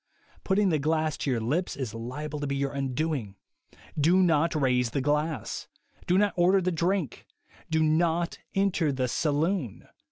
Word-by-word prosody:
Putting 200 0 +2
the 155 -3 +1
glass 155 +1 0
to - - -2
your 125 -3 +1
lips 150 +11 -1
is 130 -6 -4
liable 145 +6 -5
to 145 - -3
be 140 - -1
your 140 0 -1
undoing. 135 -5 -2 0.6
Do 175 +6 +4
not 165 -1 +2
raise 125 -4 +2
the 140 - -2
glass. 150 +3 -1 0.4
Do 180 - +3
not 205 0 +3
order 180 +2 +4
the 185 0 0
drink. 170 - -1 0.4
Do 160 -1 +2
not 165 +2 +1 0.2
enter 195 -6 +2
the 130 -2 -1
saloon. 150 - -1
155 Hz, 160 wpm, -27 LUFS, 140-175 Hz, 0.6 s, Do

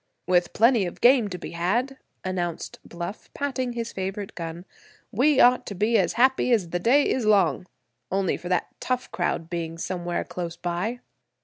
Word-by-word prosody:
"With 180 -1 +2
plenty 230 -3 +4
of 175 - -8
game 245 -3 +5
to 180 -2 -5
be 175 - -8
had," 230 +11 -1 0.3
announced 175 -3 -3
Bluff, 175 +4 -7
patting 260 -3 -2
his 230 -1 -4
favorite 195 +1 -4
gun, 170 +1 -6 0.5
"we 265 +5 +3
ought 250 -1 +5
to 200 - -5
be 215 +5 +1
as - - +1
happy 260 +1 +3
as 195 -8 +2
the 175 - 0
day 265 +10 +4
is 245 -4 0
long—only 180 - 0
for 175 - -7
that 180 -2 0
tough 255 0 -2
crowd 165 - -1
being 165 -1 -4
somewhere 175 0 -3
close 170 -2 -6
by." 180 +8 -3
190 Hz, 170 wpm, -25 LUFS, 175-240 Hz, 0.5 s, game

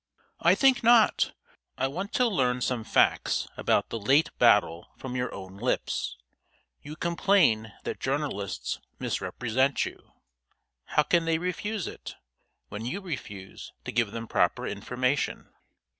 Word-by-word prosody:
"I - - +5
think 270 -2 +4
not. 230 -1 +5 0.5
I 130 - +1
want 185 +9 -5
to 250 - +3
learn 125 - +1
some 120 -2 -1
facts - - +2
about - - +1
the 115 - -4
late 135 +9 +3
battle 85 +2 +4
from 130 -1 -6
your 125 -1 -1
own 95 0 -9
lips. 115 - -2 0.6
You 150 - -8
complain 170 - +2
that - - -4
journalists 135 -8 -2 0.2
misrepresent 130 +4 0
you. - - -10 0.7
How 150 - +2
can 170 +2 +2
they 165 0 +2
avoid 180 +4 -2
it, - - -8 0.5
when 105 +2 -6
you 125 +11 -3
refuse 110 - -8
to - - -4
give 115 -2 +1
them 115 0 -6
proper - - +1
information? 125 +7 -2
130 Hz, 135 wpm, -27 LUFS, 110-170 Hz, 0.7 s, I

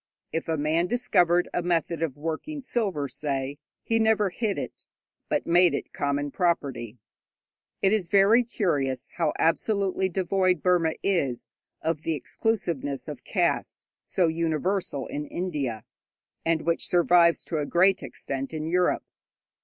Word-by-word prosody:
If 165 - -2
a 160 -1 0
man 155 +4 +1
discovered 180 -7 +3
a - - 0
method 170 -1 0
of 155 -5 -2
working 165 - -4
silver, 200 - -1
say, 140 0 -3 0.2
he 225 0 +1
never 220 -3 +3
hid 210 +1 -1
it, - - -7 0.4
but - - 0
made 175 +1 +4
it - - -6
common 145 0 -1
property. 135 - -1 0.9
It 195 +1 +4
is 195 -6 0
very 205 +5 +5
curious 145 - -1
how 165 -3 +2
absolutely 190 +2 +1
devoid 185 0 +1
Burma 175 -3 +3
is 140 - -1 0.3
of 160 -1 -1
the 160 0 -1
exclusiveness 150 - -2
of - - -7
caste - - -1 0.2
so 180 -3 +1
universal 165 -1 -1
in 150 0 -5
India, 145 -11 -3 0.6
and 165 -1 +1
which 170 0 0
survives 175 -1 +4
to 160 - -2
a 145 - -2
great 190 +3 +3
extent 135 +3 -5
in 155 0 -3
Europe. 180 +2 +1
170 Hz, 140 wpm, -26 LUFS, 150-190 Hz, 0.9 s, very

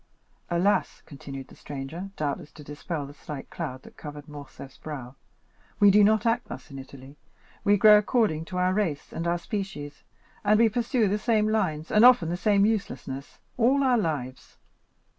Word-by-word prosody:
"Alas," 180 +4 +1
continued 135 -2 -9
the - - -15
stranger, 145 +7 -7
doubtless 145 -1 -3
to 150 - -13
dispel 145 +1 -5
the 140 - -11
slight 145 -2 -9
cloud 130 -6 -5
that - - -16
covered 145 -1 -9
Morcerf's 145 -2 -11
brow, 135 -5 -7 0.7
"we 205 -1 +7
do 210 +1 +6
not 215 +1 +3
act 230 0 +1
thus 135 +3 -9
in 135 - -7
Italy; 135 +1 -12 0.5
we 205 0 +4
grow 210 +1 +8
according 210 -8 +1
to 180 - -6
our 180 0 +2
race 185 -8 -2
and 165 - -3
our 170 +1 +1
species, 175 -7 -6 0.4
and 210 +1 +4
we 230 -1 +5
pursue 235 0 +1
the 205 +2 0
same 215 -1 +2
lines, 180 -8 -1
and 215 +1 +5
often 245 -10 +7
the 175 - -1
same 200 +1 +3
uselessness, 170 -10 -3 0.2
all 260 +4 +3
our 250 -3 +3
lives." 140 - -4
175 Hz, 175 wpm, -26 LUFS, 145-210 Hz, 0.7 s, grow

